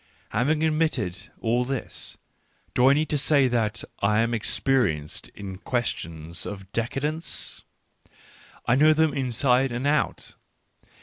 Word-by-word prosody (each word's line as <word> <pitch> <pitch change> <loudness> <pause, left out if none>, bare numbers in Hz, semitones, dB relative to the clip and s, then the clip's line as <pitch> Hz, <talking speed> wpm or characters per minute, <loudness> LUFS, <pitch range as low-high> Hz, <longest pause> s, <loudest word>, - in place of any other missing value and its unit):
Having 150 +7 +1
admitted 155 - 0
all 120 +2 +2
this, 135 0 -4 0.6
do 125 +1 +5
I - - +7
need 155 +2 +1
to 150 - +1
say 140 -1 +4
that 120 -2 0 0.2
I 105 +2 +3
am 115 +1 0
experienced 110 - 0
in 95 -2 -7
questions 85 -9 -3
of 95 -1 -8
decadence? 145 +8 -2 1.0
I 120 - +3
know 155 +4 +6
them 155 -1 +2
inside 130 0 +2
and 120 +3 -3
out. 145 0 0
125 Hz, 125 wpm, -26 LUFS, 105-145 Hz, 1.0 s, I